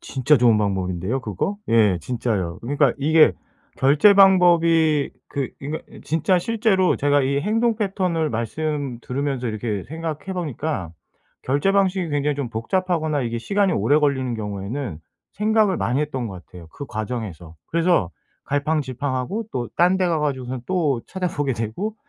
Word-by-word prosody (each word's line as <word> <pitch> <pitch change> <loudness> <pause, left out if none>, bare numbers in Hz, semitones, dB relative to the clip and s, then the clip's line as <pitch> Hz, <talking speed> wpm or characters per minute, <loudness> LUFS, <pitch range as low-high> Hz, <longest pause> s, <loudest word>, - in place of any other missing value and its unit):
진짜 135 +3 +2
좋은 120 -3 +4
방법인데요 95 +3 -1
그거? 110 - -3
예. 105 -6 +4
진짜요. 105 -5 -2
그러니까 140 +1 +2
이게 155 +3 +5 0.4
결제 150 +10 +5
방법이 170 -6 +4 0.2
그 140 -3 -3
그니까 150 +3 -4 0.3
진짜 165 +4 +2
실제로 210 -2 +1
제가 145 0 +2
이 140 +1 0
행동 225 +5 +1
패턴을 185 -7 -1
말씀 140 +3 -3
들으면서 135 -1 -2
이렇게 110 -3 -3
생각해 160 +3 -5
보니까 150 - -3 0.5
결제 145 +9 +1
방식이 190 -3 +1
굉장히 145 0 0
좀 140 -4 -3
복잡하거나 155 +4 -1
이게 115 -1 -2
시간이 200 - +1
오래 140 +5 +3
걸리는 130 -4 0
경우에는 105 - -5 0.4
생각을 215 -2 +2
많이 125 +5 0
했던 135 -5 -2
것 95 -3 -9
같아요 85 -3 -13
그 140 - -9
과정에서. 105 -7 -6
그래서 170 - +2 0.3
갈팡질팡하고 145 - -2
또 120 -2 -3
딴 180 +2 +4
데 185 - +2
가 165 -2 +1
가지고선 130 -3 -2
또 150 -9 0
찾아보게 170 -7 -2
되고 115 - -3
145 Hz, 340 characters per minute, -22 LUFS, 115-175 Hz, 0.5 s, 이게